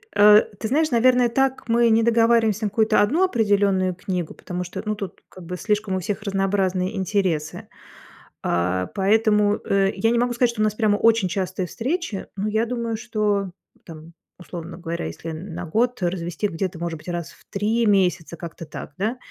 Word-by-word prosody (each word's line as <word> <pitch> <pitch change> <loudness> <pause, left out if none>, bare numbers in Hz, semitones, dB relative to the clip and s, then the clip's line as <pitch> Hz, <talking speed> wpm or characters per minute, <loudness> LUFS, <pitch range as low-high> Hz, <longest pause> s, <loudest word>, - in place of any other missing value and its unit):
Э, 210 +1 +8 0.2
ты 220 - -2
знаешь, 305 +6 +1
наверное, 245 0 +4
так 265 0 0
мы 235 0 +4
не 225 0 +4
договариваемся 225 -2 +3
на - - +1
какую-то 215 +1 +3
1 300 - +2
определенную 200 - +2
книгу, 180 -3 -4
потому 180 0 -5
что, 180 - -6
ну, 215 - 0
тут 200 -4 -7
как 185 -2 -12
бы 180 - -5
слишком 210 0 -1
у - - 0
всех 200 +3 -3
разнообразные 195 -1 0
интересы, 185 -5 -1 0.7
а. 90 +1 0
Поэтому, 210 +1 +3
э, 195 0 +2
я 225 +4 +1
не 235 - +2
могу 245 0 +1
сказать, 240 0 +2
что 215 -2 -4
у - - +4
нас 215 -1 +1
прямо 215 -2 +2
очень 225 -4 +3
частые 185 0 -2
встречи. 250 - -3
Ну, 200 +2 -2
я 220 +2 0
думаю, 235 -2 -2
что 210 -4 -1 0.4
там, 165 0 -11 0.2
условно 170 -1 -8
говоря, 170 - -4
если 85 - -6
на 170 +2 -6
год 235 +8 0
развести, 175 +2 -1
где-то, 180 0 -4
может 165 -1 -4
быть, - - -17
раз 170 -1 -4
в - - -21
3 220 +3 0
месяца, 180 -4 +1
как-то 165 -1 -8
так, 155 - -8
да. 220 +5 -1
205 Hz, 185 wpm, -23 LUFS, 180-225 Hz, 0.7 s, Э